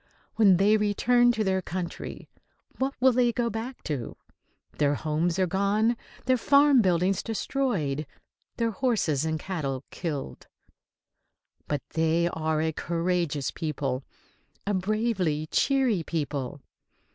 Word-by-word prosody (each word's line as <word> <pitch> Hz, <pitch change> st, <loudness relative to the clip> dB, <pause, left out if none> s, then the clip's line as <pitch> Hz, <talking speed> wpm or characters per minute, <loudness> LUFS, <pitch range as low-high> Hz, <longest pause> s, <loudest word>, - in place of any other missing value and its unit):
When 200 Hz, -5 st, +5 dB
they 205 Hz, +3 st, +4 dB
return 240 Hz, +4 st, +3 dB
to 220 Hz, -1 st, 0 dB
their 190 Hz, -1 st, +1 dB
country, 175 Hz, -1 st, -6 dB, 0.5 s
what 270 Hz, +1 st, -1 dB
will 260 Hz, +1 st, +5 dB
they 245 Hz, -1 st, +3 dB
go 235 Hz, 0 st, -1 dB
back 235 Hz, +4 st, -6 dB
to? 140 Hz, -7 st, -4 dB, 0.6 s
Their 145 Hz, -1 st, +3 dB
homes 160 Hz, +4 st, -1 dB
are 190 Hz, -, +3 dB
gone, 200 Hz, +6 st, +1 dB, 0.3 s
their 255 Hz, 0 st, +3 dB
farm 280 Hz, +1 st, +5 dB
buildings 185 Hz, 0 st, +2 dB
destroyed, 200 Hz, -, -1 dB, 0.5 s
their 230 Hz, -1 st, +1 dB
horses 200 Hz, -, 0 dB
and 160 Hz, 0 st, -1 dB
cattle 140 Hz, -8 st, -3 dB
killed. 145 Hz, -, -5 dB, 1.2 s
But 145 Hz, -2 st, -2 dB
they 165 Hz, +1 st, +2 dB
are 160 Hz, -1 st, -1 dB
a 160 Hz, -, +1 dB
courageous 170 Hz, -3 st, -1 dB
people, 140 Hz, -4 st, -3 dB, 0.6 s
a 205 Hz, -, 0 dB
bravely 190 Hz, -6 st, 0 dB
cheery 265 Hz, -9 st, +2 dB
people. 145 Hz, -4 st, -3 dB
185 Hz, 120 wpm, -27 LUFS, 155-230 Hz, 1.2 s, When